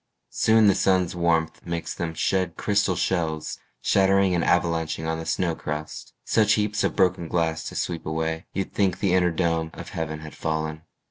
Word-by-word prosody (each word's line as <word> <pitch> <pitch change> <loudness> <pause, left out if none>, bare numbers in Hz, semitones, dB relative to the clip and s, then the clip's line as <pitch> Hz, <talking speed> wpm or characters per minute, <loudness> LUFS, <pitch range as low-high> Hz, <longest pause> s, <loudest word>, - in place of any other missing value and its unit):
Soon 110 0 +4
the 100 - +6
sun's 95 -2 +2
warmth 85 -2 0
makes 85 -1 -4
them 85 -2 -4
shed 90 0 0
crystal 100 -3 +1
shells 80 -4 -1 0.2
Shattering 95 -1 +3
and 85 -1 +1
avalanching 80 -2 +1
on 80 0 -1
the 80 - -6
snow 85 0 0
crust 75 -1 -6
Such 110 -1 +3
heaps 105 0 0
of - - 0
broken 90 -3 +2
glass 80 -1 0
to - - -6
sweep 85 -3 -3
away 80 +1 -2
You'd 95 0 -3
think 95 -3 +1
the 95 -3 +1
inner 90 -1 +4
dome 80 -1 0
of - - -8
heaven 80 -1 -4
had 75 -1 -9
fallen. 80 0 -3
85 Hz, 180 wpm, -25 LUFS, 80-95 Hz, 0.2 s, the